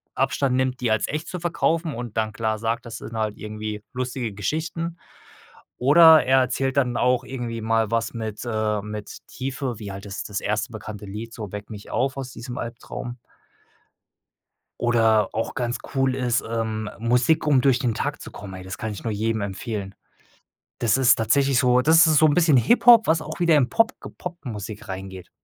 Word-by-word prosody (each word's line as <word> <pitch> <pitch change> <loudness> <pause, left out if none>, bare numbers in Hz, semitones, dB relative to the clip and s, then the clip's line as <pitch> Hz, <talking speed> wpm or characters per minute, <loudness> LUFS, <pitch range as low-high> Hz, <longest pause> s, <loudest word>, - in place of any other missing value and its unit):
Abstand 135 -3 +1
nimmt, 130 0 0
die 120 -3 +1
als 110 -1 +1
echt 155 +2 -4
zu 180 - -5
verkaufen 165 -1 0
und 120 -2 -6
dann 110 -1 0
klar 110 0 -1
sagt, 115 +2 -2
das 115 0 -6
sind 115 - -9
halt 110 -1 -2
irgendwie 105 0 -6
lustige 125 -3 -3
Geschichten 165 - -3 0.8
oder 160 +4 +7
er 130 0 +5
erzählt 130 +2 -1
dann 125 -3 +2
auch 125 0 +2
irgendwie 120 -3 -5
mal 110 -1 +1
was 115 0 0
mit, 110 -2 -5
äh 110 -2 -1
mit 105 0 -8
Tiefe, 130 -3 -4
wie 105 -3 -6
halt 95 +1 -8
das 100 -1 -5
das 105 -1 -4
1. 110 +4 -1
bekannte 105 -1 -8
Lied 110 +4 -7
so: 105 -4 -7
„Weck 105 0 -7
mich 105 -1 -9
auf 130 +1 0
aus 130 -2 -5
diesem 120 +1 -8
Albtraum.“ 120 +1 -6 1.6
Oder 115 -3 +3
auch 115 - -2
ganz 120 -3 -1 0.2
cool 135 -1 +2
ist, 125 -2 0
ähm: 110 -2 -2
„Musik, 120 +7 +2
um 135 -4 +4
durch 135 -3 +3
den 125 -4 0
Tag - - -3
zu - - -9
kommen.“ 100 -2 -9
Ey, 95 - -8
das 95 +1 -7
kann 110 - -4
ich 105 - -8
nur 115 - -2
jedem 110 +1 -1
empfehlen. 100 0 -5 0.8
Das 115 +1 +2
ist 130 -2 +5
tatsächlich 135 +4 +2
so 125 0 +4
das 160 +5 +6
ist 155 -1 +4
so 155 - +6
'n 145 - +3
bisschen 160 -4 +4
Hip-Hop, 235 - +6
was 160 0 +2
auch 155 +2 -8
wieder 170 -3 +4
im 130 -4 +3
Pop 225 0 +3
ge - - -9
Pop-Musik 110 - -7
reingeht. 95 -1 -7
120 Hz, 190 wpm, -24 LUFS, 110-135 Hz, 1.6 s, oder